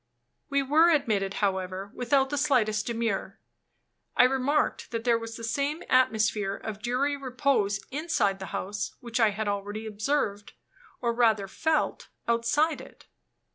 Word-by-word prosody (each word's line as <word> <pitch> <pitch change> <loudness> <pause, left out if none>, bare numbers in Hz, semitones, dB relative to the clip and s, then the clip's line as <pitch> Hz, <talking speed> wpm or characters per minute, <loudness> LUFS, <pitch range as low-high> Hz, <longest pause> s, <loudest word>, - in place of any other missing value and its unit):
We 280 -1 +2
were 310 +5 +5
admitted, 210 - +1
however, 190 0 -3
without 265 +2 +1
the 290 - -1
slightest 220 -7 +2
demur. 230 -4 -2 0.8
I - - +8
remarked 270 +3 +1
that 230 -1 -3
there 235 -1 +3
was 230 0 -7
the 230 - -9
same 280 +7 -1
atmosphere 220 -5 +2
of 210 0 -7
dreary 255 +5 0
repose 255 -6 0
inside 255 - 0
the 190 - -6
house 200 +2 -4
which 235 0 -3
I 225 -2 +5
had 210 +1 -3
already 205 +2 -3
observed, 210 -1 -2 0.5
or 235 -1 +1
rather 220 -4 +2
felt, 315 - -1 0.2
outside 235 +7 +1
it. - - -15
230 Hz, 140 wpm, -27 LUFS, 205-275 Hz, 0.8 s, I